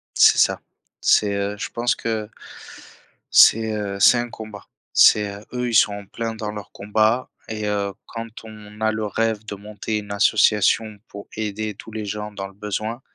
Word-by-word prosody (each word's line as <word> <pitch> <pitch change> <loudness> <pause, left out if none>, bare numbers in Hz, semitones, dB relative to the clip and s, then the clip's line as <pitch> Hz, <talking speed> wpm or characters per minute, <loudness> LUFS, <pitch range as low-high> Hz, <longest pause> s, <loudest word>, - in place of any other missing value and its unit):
C'est - - +6
ça. - - +3 0.4
C'est, 105 -1 +3
heu 100 +1 -2
je - - -4
pense 120 +1 0
que 110 -2 -3 1.0
c'est, 110 0 +6
heu, 100 -2 -3
c'est 120 - +7
un 120 0 -3
combat. 110 -2 -9 0.3
C'est, 105 -1 +5
heu 105 - -14
eux, 125 -1 -2
ils 115 - -3
sont 105 - +5
en 100 -1 -8
plein 115 +2 -4
dans 110 -1 -4
leur 105 -1 -9
combat 110 +5 0 0.2
et 110 -1 -4
heu, 100 -1 -1
quand 115 0 -6 0.2
on 105 -1 -12
a 110 0 +2
le 110 0 -2
rêve 110 +1 -1
de 105 - -5
monter 105 +2 -4
une 105 -1 -7
association, 105 +1 +3
pour 100 0 -10
aider 105 0 -3
tous 110 - -12
les 110 -1 -4
gens 105 +1 -5
dans 100 -1 -5
le - - -16
besoin. 105 +3 -4
105 Hz, 185 wpm, -22 LUFS, 105-110 Hz, 1.0 s, c'est